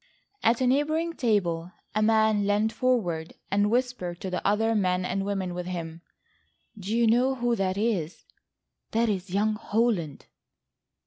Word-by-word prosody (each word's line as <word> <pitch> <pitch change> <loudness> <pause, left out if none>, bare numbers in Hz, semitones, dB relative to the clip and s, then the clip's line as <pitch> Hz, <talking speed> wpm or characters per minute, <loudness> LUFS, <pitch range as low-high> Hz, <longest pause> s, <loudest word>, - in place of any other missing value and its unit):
At 230 +2 +2
a - - +3
neighbouring 310 +6 +1
table 180 - 0 0.2
a 215 - +1
man 220 -2 +3
lent 210 +2 +2
forward 195 -12 -1 0.2
and 205 +1 +2
whispered 235 -8 -1
to 190 - -4
the 180 - -3
other 220 +3 +2
men 185 -3 +1
and 195 +2 -1
women 195 -3 -2
with 180 0 -5
him: 165 -2 -5 0.7
"Do 210 +2 -3
you 235 - +4
know 245 +4 +3
who 240 -1 0
that 190 0 -1
is?—that 220 +3 -3
is 195 -2 -2
young 205 +4 +1
Holland." 210 - -1
205 Hz, 145 wpm, -27 LUFS, 180-230 Hz, 0.7 s, you